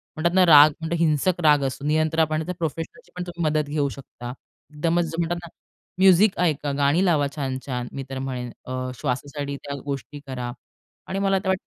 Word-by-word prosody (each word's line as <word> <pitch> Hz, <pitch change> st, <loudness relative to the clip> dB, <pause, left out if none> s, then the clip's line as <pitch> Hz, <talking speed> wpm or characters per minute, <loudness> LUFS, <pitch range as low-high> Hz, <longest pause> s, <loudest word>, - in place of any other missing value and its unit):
म्हणतात 170 Hz, +2 st, 0 dB
ना 185 Hz, -1 st, +6 dB
राग, 150 Hz, -2 st, +9 dB
मोठा 160 Hz, +1 st, -2 dB
हिंसक 165 Hz, +2 st, +2 dB
राग 150 Hz, -2 st, +5 dB
असतो. 135 Hz, +1 st, -3 dB
नियंत्रण 155 Hz, +1 st, +2 dB
आपण 155 Hz, 0 st, +1 dB, 0.2 s
प्रोफेशनलची 165 Hz, +8 st, -5 dB
पण 180 Hz, -, -3 dB
तुम्ही 175 Hz, -1 st, -5 dB
मदत 150 Hz, -1 st, 0 dB
घेऊ 145 Hz, -1 st, 0 dB
शकता. 125 Hz, -2 st, -9 dB, 0.4 s
एकदमच 165 Hz, +3 st, +1 dB
जे 165 Hz, 0 st, -6 dB
म्हणतात 170 Hz, +1 st, -1 dB
ना, -, -, -8 dB, 0.5 s
म्युझिक 190 Hz, +2 st, +6 dB
ऐका, 150 Hz, -4 st, +1 dB
गाणी 145 Hz, +5 st, +3 dB
लावा 155 Hz, -6 st, +3 dB
छान-छान. 130 Hz, -3 st, -3 dB
मी 135 Hz, -, -5 dB
तर 135 Hz, 0 st, -4 dB
म्हणेन 125 Hz, -2 st, -4 dB
अ, 130 Hz, -, -5 dB, 0.3 s
श्वासासाठी 140 Hz, +1 st, -3 dB
त्या 140 Hz, 0 st, -5 dB
गोष्टी 140 Hz, +1 st, -5 dB
करा 125 Hz, -2 st, -4 dB, 0.6 s
आणि 195 Hz, +1 st, -2 dB
मला 195 Hz, -1 st, +2 dB
तर 190 Hz, -, -7 dB
वाटतं 190 Hz, 0 st, 0 dB
150 Hz, 185 wpm, -24 LUFS, 140-170 Hz, 0.6 s, राग